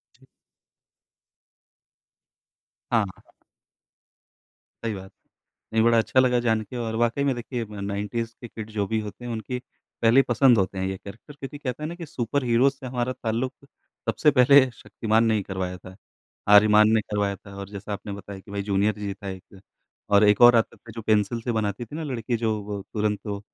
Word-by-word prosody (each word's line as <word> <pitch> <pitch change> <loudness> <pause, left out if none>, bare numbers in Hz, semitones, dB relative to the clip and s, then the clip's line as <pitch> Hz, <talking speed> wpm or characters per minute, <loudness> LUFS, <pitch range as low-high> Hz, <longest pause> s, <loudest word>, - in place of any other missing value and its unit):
जी। - - -23 2.7
हाँ, 115 -2 +4
हाँ। 95 - -14 1.5
सही 115 -2 -1
बात। 95 0 -10 0.6
नहीं, 110 - +3
बड़ा 115 0 +4
अच्छा 115 +3 +2
लगा 125 -1 +4
जान 115 -2 +1
के 120 +4 -8
और 115 -1 -3
वाक़ई 120 +4 +1
में 140 - +2
देखिए 120 0 -4
अ, 105 -1 -9
90's 105 +3 -3
के 120 - -7
किड 110 -1 -8
जो 105 -2 -1
भी 110 +2 0
होते 105 +4 -8
हैं 120 - -4
उनकी 125 +3 -4 0.4
पहली 115 +4 +6
पसंद 125 -1 +4
होते 95 0 0
हैं 95 - -1
ये 95 0 -3
कैरेक्टर 110 +10 -12
क्योंकि 135 +2 -7
कहते 140 +1 -5
हैं - - -1
ना 170 - -6
कि 175 - -7
सुपर 135 0 -2
हीरोज़ 125 +3 +3
से 130 - -9
हमारा 125 0 -2
ताल्लुक़ 120 +3 -2 0.6
सबसे 150 - +3
पहले 140 +1 +7
शक्तिमान 115 -1 0
ने 110 -1 +3
ही 105 - -1
करवाया 95 -1 -4
था, 95 0 -13 0.5
आर्यमान 105 +1 +7
ने 110 - +4
करवाया 100 -1 -1
था 100 +1 -14
और 100 0 -7
जैसा 100 0 -6
आपने 100 0 -6
बताया 100 0 -8
कि 100 - -14
भई 100 - -2
जूनियर 100 +1 +1
जी 100 -1 -3
था 100 0 -8
एक 95 +1 -10 0.5
और 100 +1 +5
एक 105 +2 +4
और 120 0 +9
आता 115 - +1
था 115 - -13
जो 115 - -5
पेंसिल 110 +2 +1
से 120 - -2
बनाती 110 +1 -2
थी 145 - -10
ना 160 - -4
लड़की 120 -4 -2
जो 110 -2 0
वो 100 -1 -5
तुरंत 105 -2 0
वो, 100 -1 -3
110 Hz, 195 wpm, -25 LUFS, 100-120 Hz, 2.7 s, और